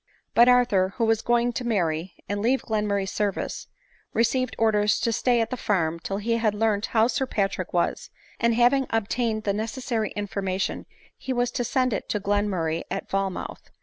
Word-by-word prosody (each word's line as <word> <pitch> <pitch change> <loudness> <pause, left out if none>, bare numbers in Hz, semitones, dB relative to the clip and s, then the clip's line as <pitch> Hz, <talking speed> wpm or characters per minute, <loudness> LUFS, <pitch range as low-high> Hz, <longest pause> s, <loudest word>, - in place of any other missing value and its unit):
But 240 +1 +6
Arthur, 235 -6 +3
who 230 - +2
was 225 0 +2
going 240 0 +1
to 250 - -3
marry, 175 -6 -1
and 205 +1 -2
leave 255 +5 +1
Glen 215 -1 -1
murray 200 -1 0
's 195 - -5
service, 205 -2 -2 0.5
received 240 +2 +1
orders 210 -2 +2
to 230 - +1
stay 240 +1 +2
at 225 - -2
the 255 - -2
farm 170 -8 0
till 195 +4 -4
he 230 +3 0
had 215 -3 +1
learnt 215 -1 +1
how 220 -1 +3
Sir 260 +2 0
Patrick 195 -5 -1
was; 175 - -1 0.3
and 235 -1 +2
having 250 +3 +3
obtained 225 0 -1
the 200 - 0
necessary 220 +1 -2
information 195 -2 -3 0.3
he 265 - -4
was 245 0 0
to 245 - -1
send 255 0 +1
it - - -4
to 210 - 0
Glenmur 205 -3 0
ray 160 +1 -1
at - - -4
Falmouth. 195 -1 -3
220 Hz, 190 wpm, -25 LUFS, 200-240 Hz, 0.5 s, But